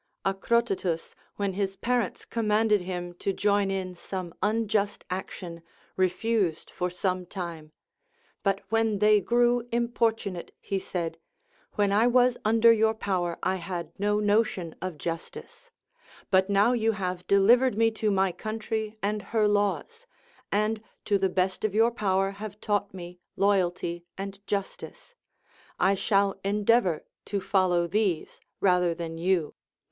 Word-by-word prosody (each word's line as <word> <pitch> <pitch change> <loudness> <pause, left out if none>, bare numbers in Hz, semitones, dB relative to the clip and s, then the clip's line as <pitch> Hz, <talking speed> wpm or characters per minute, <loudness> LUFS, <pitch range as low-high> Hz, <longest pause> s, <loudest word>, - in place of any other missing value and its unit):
Acrotatus, 195 -4 0 0.2
when 200 -2 -1
his 195 0 -2
parents 240 +1 -1
commanded 215 -2 +2
him 175 -1 -5
to 195 - 0
join 200 0 +1
in 190 -1 -3
some 180 -1 -6
unjust 210 -1 0
action, 180 -2 -5 0.3
refused 185 -1 0
for 180 - -2
some 180 +1 -1
time; 170 -5 -6 0.7
but 195 -1 0
when 225 -1 +2
they 210 0 +5
grew 240 +3 +2
importunate, 230 -6 -1
he 195 - -2
said: 165 -3 -4 0.5
When 205 -1 +1
I 215 +4 +4
was 250 0 +4
under 230 +1 +6
your 220 0 +2
power 180 -5 -1
I 190 0 +1
had 175 -1 -5
no 210 +1 +1
notion 205 -5 +1
of 185 -4 -4
justice, 465 - -7 0.6
but 190 +1 +4
now 200 +4 +4
you 225 -2 +2
have 180 -2 -4
dehvered 235 +5 +5
me 225 +1 +3
to 215 - +3
my 195 -2 +2
country 220 +2 -4
and 210 +1 0
her 215 +2 +1
laws, 205 - -1 0.4
and 215 +2 +1 0.2
to 200 -2 +2
the 190 0 +2
best 185 +1 -1
of 215 -2 0
your 225 +2 +4
power 195 -4 +1
have 205 +1 -8
taught 205 -1 -1
me 180 -1 -9 0.2
loyalty 175 -3 0
and 195 0 -6
justice, 200 - -5 0.7
I 195 - +4
shall 200 0 +1
endeavor 205 -3 +2 0.2
to 200 - -2
fol 190 -1 +2
low 175 -1 +2
these 190 -3 -1 0.2
rather 180 -3 +3
than 165 -1 -6
you. 175 -3 +1
200 Hz, 140 wpm, -27 LUFS, 185-220 Hz, 0.7 s, under